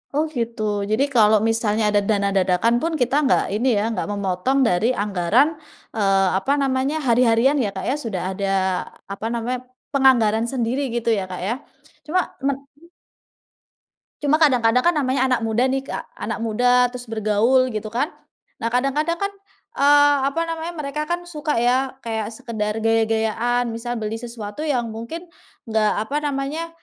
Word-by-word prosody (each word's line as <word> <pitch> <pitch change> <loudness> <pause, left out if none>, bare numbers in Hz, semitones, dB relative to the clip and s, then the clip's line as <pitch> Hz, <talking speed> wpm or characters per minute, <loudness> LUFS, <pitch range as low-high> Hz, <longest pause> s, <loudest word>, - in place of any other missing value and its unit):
Oh, 300 - +3
gitu, 230 -1 -3 0.3
jadi 220 +5 +3
kalau 215 -2 +6
misalnya 225 -1 +1
ada 205 0 +3
dana 200 -2 +2
dadakan 185 +5 +2
pun 330 - 0
kita 245 +2 +1
nggak 265 - +3
ini 235 +5 0
ya 205 - 0
nggak 225 - -3
memotong 200 +7 0
dari 180 +2 +1 0.2
anggaran, 205 - +2 0.5
eee, 195 -2 +3
apa 230 +8 -1
namanya, 270 +2 0
hari-harian 235 +3 +4
ya, 205 - 0
Kak, 190 - -4
ya. 270 - +1
Sudah 195 -6 -3
ada 195 0 -2 0.7
apa 200 - -7
namanya, 240 +2 -2 0.3
penganggaran 235 -5 +4
sendiri 255 +1 -1
gitu 235 -1 -1
ya, - - -3
Kak, 180 - -5
ya. 230 - +1 0.5
Cuma 355 +5 +1 0.2
men 275 0 +1 0.2
mhm? 335 +4 -21 1.3
Cuma 295 +1 +3
kadang-kadang 250 -4 +3
kan 345 - +5
namanya 270 -4 0
anak 250 -3 +1
muda 225 +2 +1
nih 265 +1 0
Kak 270 - -6
anak - - -4
muda 245 +3 +3
terus 245 -2 -8
bergaul 225 +4 +2
gitu 215 0 -4
kan, 250 +8 -2 0.5
nah 230 - 0
kadang-kadang 275 +7 0
kan, 400 +2 -2 0.4
eee, 290 +1 +5
apa 330 +4 -2
namanya 330 +1 -5
mereka 300 +2 -4
kan 350 0 -2
suka 305 -5 -3
ya 255 +2 +1
kayak 220 -2 -2
sekedar 220 -3 -4
gaya-gayaan 225 +2 +1
misal 240 +1 -4
beli 220 +1 -4
sesuatu 230 +1 -7
yang 245 -7 -1
mungkin, 235 +11 -7 0.4
enggak 220 -2 +1
apa 290 +6 -2
namanya, 290 +3 -3
240 Hz, 160 wpm, -22 LUFS, 220-275 Hz, 1.3 s, kalau